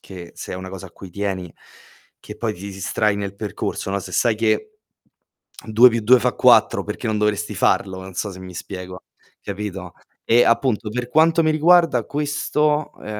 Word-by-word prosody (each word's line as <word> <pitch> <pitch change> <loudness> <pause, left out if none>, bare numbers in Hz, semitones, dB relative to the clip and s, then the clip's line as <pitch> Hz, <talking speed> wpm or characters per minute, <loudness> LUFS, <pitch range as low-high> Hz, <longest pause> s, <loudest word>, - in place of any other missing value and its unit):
che 90 -3 -11
se - - -8
è - - -4
una 95 0 -7
cosa 95 0 -8
a - - -15
cui 95 - -12
tieni, 95 -2 -4 0.7
che - - -11
poi 110 -2 -2
ti 90 - -13
distrai 100 +2 -1
nel 100 -1 -5
percorso, 100 -1 -4
no; 100 - -1
se 95 - -9
sai 115 +5 +2
che 115 - -1 0.9
2+2 115 +2 +5
fa - - +1
4, - - +4
perché - - -5
non 110 - 0
dovresti 105 0 -1
farlo, 95 -1 0
non 95 0 -10
so 105 +3 -3
se 95 - -11
mi 95 0 -9
spiego, 90 0 -8 0.4
capito? 95 -3 -6 0.3
E 120 +1 +5
appunto, 115 -2 +1
per 125 +1 -4
quanto 165 +4 +4
mi 155 - +3
riguarda 165 -4 +4
questo, 150 +1 -1
ehm, - - -13
105 Hz, 175 wpm, -21 LUFS, 95-125 Hz, 0.9 s, 2+2